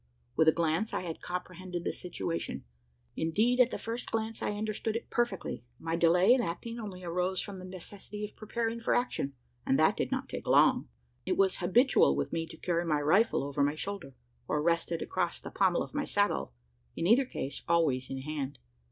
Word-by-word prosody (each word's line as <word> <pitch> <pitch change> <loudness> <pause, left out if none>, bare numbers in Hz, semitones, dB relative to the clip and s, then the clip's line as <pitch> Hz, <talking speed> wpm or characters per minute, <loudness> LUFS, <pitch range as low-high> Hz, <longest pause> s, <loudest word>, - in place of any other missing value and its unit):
With 160 - +4
a - - +9
glance, 165 +6 0
I - - 0
had 170 -3 -6
comprehended 180 0 -5
the - - -1
situation: 175 -1 -4 0.5
indeed, 215 +10 +2
at 250 -1 +6
the - - -4
first 230 +2 -4
glance 225 0 -2
I - - -1
understood 215 +1 -2
it 230 - -5
perfectly. 240 - -1
My 165 +3 -2
delay 175 +6 +5
in 255 - +3
acting 230 +5 -4
only 190 -5 -7
arose 180 +2 -1
from 200 -2 -5
the 185 - -8
necessity 195 +3 -7
of 210 - -11
preparing 230 +1 -2
for 230 - +1
action; 190 - -1 0.3
and 135 - +2
that 155 - +4
did - - -2
not - - -1
take - - -6
long. - - +5 0.3
It - - -1
was 195 -1 +3
habitual 190 - +4
with 70 0 -2
me 165 0 -1
to 160 - -11
carry 170 0 0
my 155 -3 +1
rifle 160 +5 +3
over 140 0 -2
my 145 +1 +2
shoulder, 170 -6 -5 0.3
or 150 - +1
rested 170 +1 +1
across 175 -2 -1
the - - -8
pommel 185 -3 +2
of - - -10
my 290 -1 -1
saddle: 205 - +1 0.4
in - - -2
either 240 +8 +5
case, 140 - -5
always 155 -7 +2
in 135 0 -4
hand. 145 -1 -4
180 Hz, 195 wpm, -31 LUFS, 160-215 Hz, 0.5 s, a